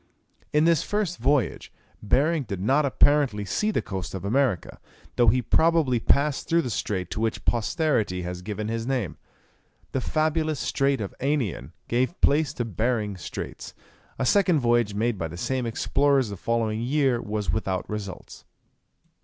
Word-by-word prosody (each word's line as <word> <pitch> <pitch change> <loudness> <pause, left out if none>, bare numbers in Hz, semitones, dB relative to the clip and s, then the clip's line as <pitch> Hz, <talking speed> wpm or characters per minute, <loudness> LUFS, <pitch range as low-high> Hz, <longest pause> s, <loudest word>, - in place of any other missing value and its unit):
In 150 +1 +3
this 165 -3 +4
first 205 -4 -2
voyage 130 - 0 0.3
Behring 150 +10 +2
did 100 -7 -5
not 140 +9 +2
apparently 135 -7 +3
see 210 - 0
the 215 - 0
coast 95 -1 -5
of 95 0 -6
America, 115 - 0 0.4
though 120 - +3
he 125 +3 +4
probably 160 -7 +3
passed 140 +5 +1
through 170 0 +3
the 125 - -3
strait 95 -4 -3
to - - -3
which 110 -1 -2
posterity 115 - 0
has 90 0 -5
given 105 +2 -4
his 115 +1 -3
name. 125 -9 -2 0.7
The 130 - -1
fabulous 155 +1 0
strait 135 -2 0
of 100 - -5
Anian 135 - -1
gave 130 +8 0
place 145 0 +3
to 120 - -2
Behring 110 -2 -1
Straits. 90 - -7 0.4
A 130 - -1
second 185 +2 +4
voyage 120 -4 +2
made 110 -1 0
by 80 - -2
the 85 +2 -9
same 130 +5 -1
explorers 135 +2 +1
the 100 - -5
following 110 +1 -1
year 130 -1 +1
was 105 -1 -2
without 95 -4 -2
results. 105 -3 -7
120 Hz, 160 wpm, -25 LUFS, 105-145 Hz, 0.7 s, this